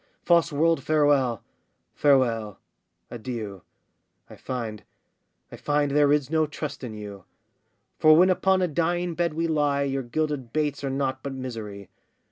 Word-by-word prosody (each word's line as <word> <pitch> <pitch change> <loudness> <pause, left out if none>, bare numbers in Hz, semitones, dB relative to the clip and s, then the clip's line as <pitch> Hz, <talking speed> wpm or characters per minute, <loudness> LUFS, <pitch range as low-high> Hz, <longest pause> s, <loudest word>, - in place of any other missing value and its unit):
false 170 -1 +4
world, 160 0 +2
farewell! 145 -7 +2 0.5
farewell! 115 -7 +2 0.5
adieu! 110 -5 -6 0.7
I - - -10
find, 115 -5 -5 0.7
I - - -9
find, 145 -1 0
there 145 0 +4
is 145 -1 +1
no 160 -1 +2
trust 150 -2 -6
in 115 -4 -6
you! 100 -3 -9 0.7
For 155 0 +7
when 185 +2 +6
upon 190 0 +2
a - - +2
dying 175 +2 -1
bed 170 -1 -1
we 165 +1 0
lie, 145 -3 +1
Your 135 -1 -1
gilded 135 -1 -3
baits 150 -1 -1
are 135 - -1
nought 135 0 -2
but 140 - -5
misery. 110 -7 -7
140 Hz, 145 wpm, -25 LUFS, 120-155 Hz, 0.7 s, For